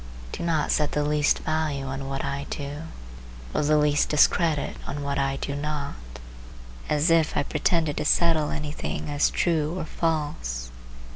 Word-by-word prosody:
Do - - -5
not 165 -3 +1
set 150 -1 +1
the 150 - +1
least 150 0 +2
value 155 -3 -1
on 135 0 -4
what 135 0 -2
I 140 0 -3
do, 145 +2 -5 0.7
or - - +1
the 150 +1 +3
least 150 -1 +3
discredit 150 0 +3
on 145 +1 -4
what 140 0 -1
I 135 0 +1
do 140 - -3
not, 145 -1 -3 1.0
as 150 +3 +3
if 165 -2 +3
I - - +3
pretended 160 -1 0
to 150 - -1
settle 160 -2 +3
any 150 -1 -3
thing 150 - -4
as 145 0 +3
true 165 -1 0
or 165 - -3
false. 145 - -2
150 Hz, 165 wpm, -26 LUFS, 140-155 Hz, 1.0 s, the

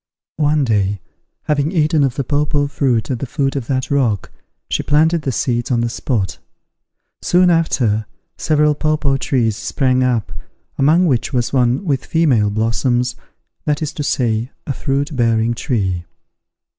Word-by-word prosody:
One 150 -1 +2
day, 100 -4 0 0.4
having 150 +1 0
eaten 155 -3 +2
of 135 -3 0
the 140 - -1
papaw 145 +1 0
fruit 130 -4 0
at 125 - -2
the 135 - -4
foot 135 +2 -1
of 130 -4 -3
that 130 -1 -2
rock, 120 -9 0 0.4
she - - -1
planted 160 +3 +2
the 140 - -2
seeds 120 0 -1
on 120 -3 +1
the 120 - 0
spot. 115 -5 -2 0.8
Soon 180 0 +4
after, 115 -10 +1 0.3
several 150 -1 +2
papaw 150 -2 0
trees 120 -5 0
sprang 130 +2 0
up, 115 -8 0 0.4
among 155 +6 +4
which 130 -6 0
was 120 0 -1
one 125 +6 +2
with 140 -6 0
female 135 -11 +2
blossoms, 120 +3 0 0.5
that 150 +1 0
is 155 - -3
to - - -5
say, 120 -4 0 0.2
a 140 - -2
fruit 140 +2 -2
bearing 115 -1 +2
tree. 95 -8 -2
130 Hz, 155 wpm, -18 LUFS, 115-150 Hz, 0.8 s, Soon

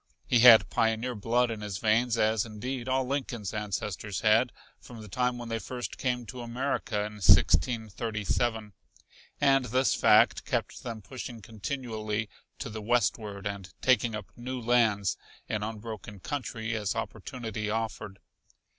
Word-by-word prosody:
He 120 - +3
had 115 -2 +8
pioneer 115 +2 +1
blood 120 +3 +1
in 110 -2 -5
his 105 -2 -4
veins, 115 +2 +2
as, 110 -1 +2
indeed, 120 +3 -5
all 130 0 +2
Lincoln's 125 -6 -3
ancestors 105 -1 -3
had, 115 +3 +4 0.3
from 120 -2 -11
the - - -10
time 125 +4 0
when 120 -1 -7
they 115 0 -1
first 125 +1 -6
came 125 -2 -1
to 125 +2 -8
America 120 -3 -2
in 105 0 -7
1637; 110 - +2 0.7
and 135 -2 +4
this 130 +3 +2
fact - - +5
kept - - -2
them 115 -3 -6
pushing 120 +1 -7
continually 110 -1 -4 0.3
to - - -5
the 110 0 -6
westward 105 -3 0
and 100 -2 -5
taking 120 -3 +3
up 105 -2 -7
new 125 +1 -5
lands 115 -5 +2 0.3
in 105 - -2
unbroken 105 -2 -6
country 115 -2 -3
as 105 -3 -1
opportunity 110 -4 -4
offered. 110 -2 -3
115 Hz, 145 wpm, -29 LUFS, 105-125 Hz, 0.7 s, had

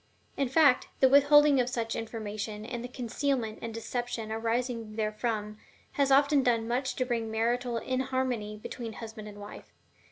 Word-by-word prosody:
In 275 -3 0
fact, 280 -2 +4
the 265 - +6
withholding 285 +1 +6
of 250 0 +1
such 230 -3 -2
information, 215 -1 -5
and 235 0 -5
the - - -4
concealment 250 -2 -2
and 230 - -4
deception 230 0 -4
arising 230 0 -2
therefrom, 215 -1 -2 0.3
has 280 -1 +1
often 280 +1 +5
done 230 -3 +1
much 255 +2 -1
to 255 - 0
bring 230 -3 -2
marital 235 +2 0
inharmony 255 -4 -2
between 225 +1 -7
husband 220 -1 -8
and 205 -1 -10
wife. 205 0 -10
235 Hz, 155 wpm, -29 LUFS, 220-260 Hz, 0.3 s, the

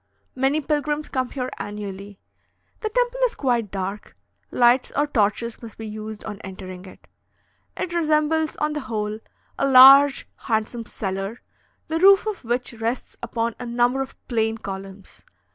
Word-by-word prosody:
Many 270 +4 +1
pilgrims 295 0 -1
come 255 -2 -1
here 255 -1 -4
annually. 200 -1 -7 0.6
The 435 - -2
temple - - 0
is 485 - -2
quite 240 -6 0
dark; 195 +2 -5 0.3
lights 245 +1 +3
or 290 - +2
torches 235 -3 0
must 230 -3 -10
be 225 - -7
used 215 0 -7
on 210 -1 -7
entering 185 -1 -9
it. 185 - -15 0.7
It 345 - -3
resembles, 315 -1 +1
on 300 0 -1
the 300 - -2
whole, 215 -4 -3 0.4
a 275 - +2
large 270 +2 +8
handsome 225 0 -2
cellar, 195 +3 -4 0.4
the 325 +1 -1
roof 390 +3 +6
of 430 -7 -4
which 240 +1 -2
rests 230 +2 -3
upon 230 0 -2
a 250 - -5
number 245 +3 +1
of 270 - -6
plain 225 -2 0
columns. 195 -1 -9
240 Hz, 150 wpm, -23 LUFS, 210-285 Hz, 0.7 s, large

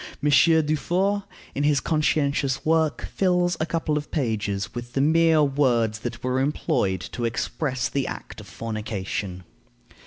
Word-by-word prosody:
Monsieur 160 +2 +5
Dufour, 185 +7 0 0.3
in 140 - -2
his 145 -1 +3
conscientious 140 -3 0
work, 160 -1 +1
fills 180 -2 +2
a 155 - -1
couple 160 -3 0
of 150 - -10
pages 110 -7 -2
with 120 0 -7
the - - 0
mere 160 +1 +4
words 125 -6 +1
that 115 0 -6
were 130 +1 0
employed 100 - 0
to 120 +6 -6
express 125 +3 -1
the 140 -1 -2
act - - -7
of - - -13
fornication. 105 -4 -4
140 Hz, 145 wpm, -24 LUFS, 115-155 Hz, 0.3 s, Monsieur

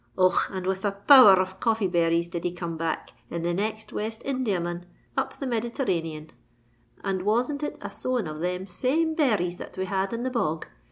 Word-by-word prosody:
Och! 185 0 +5 0.2
and 190 -2 -4
with 190 0 -1
a 205 - +1
power 210 +1 +8
r - - +1
of 185 0 -2
coffeeberries 175 -7 +2
did 170 0 -5
he 175 - 0
come 170 -1 -5
back, 165 0 -3 0.2
in 170 0 -4
the 175 0 0
next 215 +4 -3
West 220 +1 -4
Indiaman, 185 -10 -2 0.3
up - - -2
the 275 - -4
Meditherranean; 190 - -2 0.7
and 195 -2 -1
wasn't 245 +9 +1
it 295 0 -3
a - - -5
sowing 250 -7 -2
of 155 0 -6
them 180 +1 -2
same 275 - 0
berries 210 - +1
that - - -9
we 190 - -1
had 190 +1 -1
in 230 +1 -3
the 260 - -1
bog! 165 -10 -1
190 Hz, 190 wpm, -26 LUFS, 175-235 Hz, 0.7 s, power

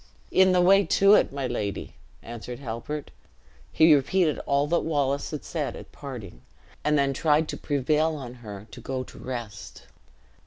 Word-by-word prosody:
"In 190 0 +5
the 180 -1 +4
way 195 +3 +6
to 195 +1 +4
it, - - +4
my 140 -1 -3
lady!" 105 -5 -3 0.3
answered 120 +1 -7
Halbert. 135 +4 -6 0.6
He 160 0 +6
repeated 150 +3 +2
all 140 +1 +2
that 170 +3 +1
Wallace 140 -3 -1
had 150 - -5
said 150 -5 -3
at - - -11
parting, 115 - -9 0.4
and 150 0 +2
then 140 -1 +2
tried 155 +2 +2
to - - -3
prevail 150 +3 +1
on 130 -5 -7
her 105 -2 -8
to - - -10
go 130 -1 -3
to - - -14
rest. 115 -6 -7
140 Hz, 165 wpm, -26 LUFS, 125-155 Hz, 0.6 s, way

